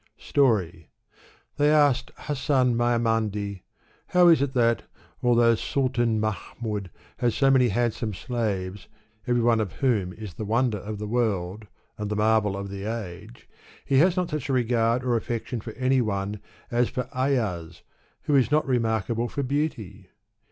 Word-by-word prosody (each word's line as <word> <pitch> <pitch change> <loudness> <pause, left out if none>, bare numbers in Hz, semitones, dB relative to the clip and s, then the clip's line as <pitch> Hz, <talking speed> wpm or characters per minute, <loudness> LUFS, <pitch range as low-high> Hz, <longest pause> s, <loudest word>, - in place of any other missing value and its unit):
Story. 95 - +1 0.7
They 145 0 +4
asked 145 -4 +3
Hasan 130 -4 +1
Maimandi, 115 -4 0 0.2
" - - -35
How 180 -1 +7
is 160 -5 +5
it 140 -1 -1
that, 115 -3 +3 0.4
although 120 -1 +4
Sultan 120 -2 0
Mahmud 105 -1 -4 0.3
has 120 -2 0
so 135 -1 +4
many 130 -2 +5
handsome 115 +1 -1
slaves, 100 -5 -3 0.4
every 120 -1 +2
one 115 -1 +3
of 105 -5 -2
whom 110 -10 0
is 105 -4 -8
the 110 - -6
wonder 115 0 +1
of 105 +2 -6
the 105 - -5
world, 105 -3 -1 0.3
and 105 -1 -3
the 105 - -1
marvel 105 -2 +2
of 100 0 -5
the 100 0 -6
age, 105 - -7 0.4
he 135 - +3
has 180 +4 +4
not 180 -2 -1
such 150 -2 -3
a - - +1
regard 120 -1 +1
or 125 -2 +1
affection 115 +1 -3
for 110 0 -8
any 130 +2 +2
one 100 -1 -2 0.3
as 120 0 +2
for 125 -1 -4
Ayaz, 110 -11 -1 0.4
who 145 - +1
is 130 -3 +4
not 150 +1 +2
remarkable 115 -2 0
for 140 - -3
beauty?" 115 - -3
115 Hz, 160 wpm, -25 LUFS, 105-130 Hz, 0.7 s, How